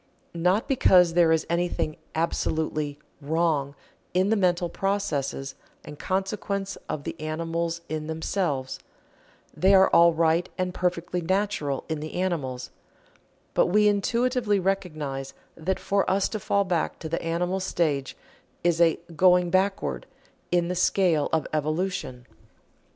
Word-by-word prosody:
Not 180 Hz, +5 st, +1 dB
because 180 Hz, -10 st, +5 dB
there 170 Hz, -1 st, +4 dB
is 160 Hz, -1 st, +2 dB
anything 170 Hz, -2 st, -1 dB, 0.2 s
absolutely 155 Hz, -2 st, -1 dB, 0.2 s
"Wrong" 150 Hz, -2 st, 0 dB, 0.4 s
in 190 Hz, +3 st, +3 dB
the -, -, +4 dB
mental 180 Hz, -3 st, +1 dB
processes 160 Hz, -9 st, -2 dB, 0.3 s
and 150 Hz, -, -10 dB
consequent 195 Hz, +1 st, -2 dB
of 145 Hz, -, -3 dB
the -, -, -5 dB
animals 165 Hz, +2 st, -3 dB
in 155 Hz, 0 st, -4 dB
themselves 160 Hz, -4 st, -2 dB, 0.8 s
they 195 Hz, +2 st, +4 dB
are 190 Hz, 0 st, +5 dB
all 170 Hz, 0 st, +7 dB
right 165 Hz, +1 st, +1 dB
and 185 Hz, -1 st, -1 dB
perfectly 180 Hz, 0 st, -1 dB
natural 185 Hz, -6 st, -1 dB
in 160 Hz, -2 st, -3 dB
the 155 Hz, +1 st, -7 dB
animals 145 Hz, -9 st, -2 dB, 0.8 s
but -, -, +3 dB
we 210 Hz, +3 st, +4 dB
intuitively 230 Hz, +1 st, +1 dB
recognize 155 Hz, -8 st, -3 dB, 0.2 s
that 180 Hz, +4 st, -2 dB
for 200 Hz, -1 st, 0 dB
us 190 Hz, +1 st, +2 dB
to 215 Hz, -, -4 dB
fall 200 Hz, 0 st, +1 dB
back 180 Hz, -4 st, -1 dB
to 160 Hz, -, -6 dB
the 165 Hz, +2 st, -2 dB
animal 175 Hz, +3 st, -1 dB
stage 150 Hz, -7 st, -1 dB, 0.5 s
is 175 Hz, -1 st, +2 dB
a 165 Hz, -1 st, +4 dB, 0.2 s
"going 180 Hz, +1 st, +4 dB
backward" 185 Hz, -, 0 dB, 0.4 s
in 175 Hz, -1 st, +2 dB
the 180 Hz, -, -1 dB
scale 175 Hz, -4 st, +2 dB
of 160 Hz, -, +1 dB
evolution. 155 Hz, -4 st, -2 dB
170 Hz, 135 wpm, -26 LUFS, 155-190 Hz, 0.8 s, all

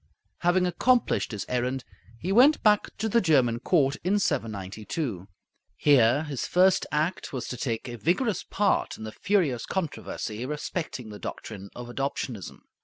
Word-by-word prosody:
Having 180 Hz, +1 st, +3 dB
accomplished 245 Hz, -, +2 dB
his 105 Hz, -3 st, -4 dB
errand, 125 Hz, +1 st, -1 dB, 0.3 s
he 180 Hz, +10 st, -3 dB
went 260 Hz, +9 st, +6 dB
back 210 Hz, -1 st, +4 dB
to 220 Hz, -, -1 dB
the 235 Hz, +2 st, +3 dB
German 130 Hz, -9 st, +3 dB
court 140 Hz, 0 st, +2 dB
in 190 Hz, +4 st, +2 dB
792. 105 Hz, -, -3 dB, 0.5 s
Here 140 Hz, -1 st, +4 dB
his 145 Hz, -5 st, -4 dB
first 185 Hz, +1 st, +4 dB
act 155 Hz, +5 st, -1 dB
was 130 Hz, -3 st, -4 dB
to -, -, -4 dB
take 115 Hz, -2 st, -3 dB
a 120 Hz, -1 st, -6 dB
vigorous 185 Hz, -, 0 dB
part 205 Hz, 0 st, 0 dB
in -, -, -9 dB
the 110 Hz, -, -5 dB
furious 160 Hz, -, 0 dB
controversy 145 Hz, -, -4 dB
respecting 145 Hz, -3 st, -4 dB
the 105 Hz, -1 st, -9 dB
doctrine 100 Hz, -3 st, -7 dB
of 120 Hz, 0 st, -7 dB
Adoptionism. 120 Hz, -, -4 dB
140 Hz, 150 wpm, -27 LUFS, 115-185 Hz, 0.5 s, went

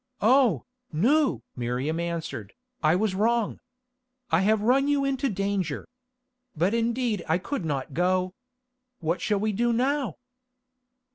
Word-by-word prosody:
"Oh, 235 Hz, -, +4 dB, 0.3 s
Nou!" 220 Hz, -, +2 dB
Miriam 125 Hz, +6 st, -2 dB
answered, 165 Hz, -, -4 dB, 0.3 s
"I 155 Hz, +1 st, +4 dB
was 205 Hz, +1 st, +1 dB
wrong. 225 Hz, +2 st, +1 dB, 0.7 s
I 160 Hz, +2 st, +4 dB
have 210 Hz, +1 st, +2 dB
run 265 Hz, +5 st, +3 dB
you 285 Hz, -1 st, +2 dB
into 275 Hz, 0 st, 0 dB
danger. 195 Hz, -2 st, -2 dB, 0.7 s
But 180 Hz, +7 st, +2 dB
indeed 230 Hz, -3 st, 0 dB
I 160 Hz, -, +4 dB
could 185 Hz, -, -4 dB
not 140 Hz, -1 st, -3 dB
go. 185 Hz, +3 st, +1 dB, 0.7 s
What 165 Hz, +1 st, -1 dB
shall 210 Hz, -2 st, +1 dB
we 215 Hz, +1 st, 0 dB
do 235 Hz, +4 st, +1 dB
now?" 265 Hz, +3 st, 0 dB
200 Hz, 130 wpm, -26 LUFS, 165-240 Hz, 0.7 s, Oh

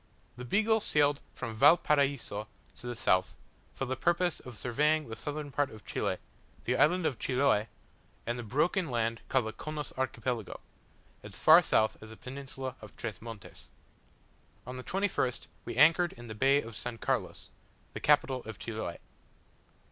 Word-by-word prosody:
The 125 Hz, +1 st, -8 dB
Beagle 220 Hz, -, +3 dB
sailed 145 Hz, -7 st, +3 dB
from 120 Hz, -3 st, -5 dB
Valparaiso 140 Hz, -5 st, +3 dB, 0.3 s
to 125 Hz, -, -8 dB
the 120 Hz, -, -3 dB
south, 95 Hz, -6 st, +2 dB, 0.4 s
for 135 Hz, -, -2 dB
the 130 Hz, 0 st, -2 dB
purpose 175 Hz, +5 st, +1 dB
of 125 Hz, -3 st, -10 dB
surveying 150 Hz, +6 st, +1 dB
the 110 Hz, -, -5 dB
southern 145 Hz, +3 st, -5 dB
part 145 Hz, +1 st, +1 dB
of 110 Hz, -1 st, -13 dB
Chile, -, -, -1 dB, 0.5 s
the 125 Hz, -, +1 dB
island 160 Hz, +6 st, +3 dB
of 130 Hz, -, -1 dB
Chiloe, 130 Hz, -5 st, +2 dB, 0.6 s
and 120 Hz, +1 st, -2 dB
the -, -, -2 dB
broken 160 Hz, -, 0 dB
land 115 Hz, -2 st, -1 dB
called 130 Hz, -4 st, +2 dB
the 110 Hz, -, -4 dB
Chonos 155 Hz, -2 st, -5 dB
Archipelago, 120 Hz, -4 st, -2 dB, 0.6 s
as -, -, -9 dB
far -, -, +8 dB
south 110 Hz, -, +2 dB
as 110 Hz, -, -10 dB
the 110 Hz, -, -11 dB
Peninsula 130 Hz, -1 st, -6 dB
of 110 Hz, -, -12 dB
Tres 110 Hz, -5 st, -5 dB
Montes. 115 Hz, -3 st, -10 dB, 1.0 s
On 125 Hz, -, -6 dB
the 130 Hz, -, -6 dB
21st 185 Hz, -10 st, -1 dB, 0.2 s
we -, -, -5 dB
anchored 170 Hz, +2 st, +5 dB
in 120 Hz, -, -11 dB
the 110 Hz, -, -7 dB
bay 135 Hz, +6 st, +3 dB
of 115 Hz, -, -9 dB
S. 120 Hz, +1 st, -5 dB
Carlos, -, -, -2 dB, 0.4 s
the -, -, -5 dB
capital 135 Hz, -3 st, +3 dB
of 110 Hz, -3 st, -7 dB
Chiloe. 110 Hz, -7 st, -5 dB
130 Hz, 165 wpm, -31 LUFS, 115-150 Hz, 1.0 s, far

